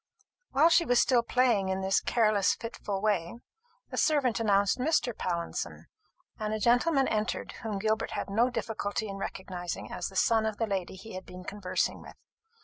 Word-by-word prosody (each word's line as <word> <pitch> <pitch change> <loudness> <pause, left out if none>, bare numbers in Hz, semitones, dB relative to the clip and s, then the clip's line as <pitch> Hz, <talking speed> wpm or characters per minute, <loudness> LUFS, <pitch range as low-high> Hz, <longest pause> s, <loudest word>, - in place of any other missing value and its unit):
While 300 +5 +5
she 340 0 +5
was 245 -6 +3
still 250 -3 +4
playing 235 -5 +2
in 190 0 -1
this 190 0 +2
careless 215 -4 +2
fitful 205 -4 -5
way, 205 -2 0 0.5
a - - -5
servant 280 -7 +2
announced 200 -1 +2
Mr. 255 -4 +1
Pallinson; 170 -2 -3 0.5
and 215 0 -1
a - - -3
gentleman 260 +5 +3
entered 215 0 -1
whom 220 -3 -3
Gilbert 215 +2 0
had - - -3
no 225 +5 +2
difficulty 220 -2 -3
in 195 -1 -6
recognizing 185 -3 -5
as - - -3
the 195 - -11
son 220 +2 +3
of 215 -1 -3
the 225 - 0
lady 190 -4 -3
he 195 +3 -10
had 185 0 -7
been 180 0 -9
conversing 200 -1 -2
with. - - -12
215 Hz, 175 wpm, -29 LUFS, 195-235 Hz, 0.5 s, While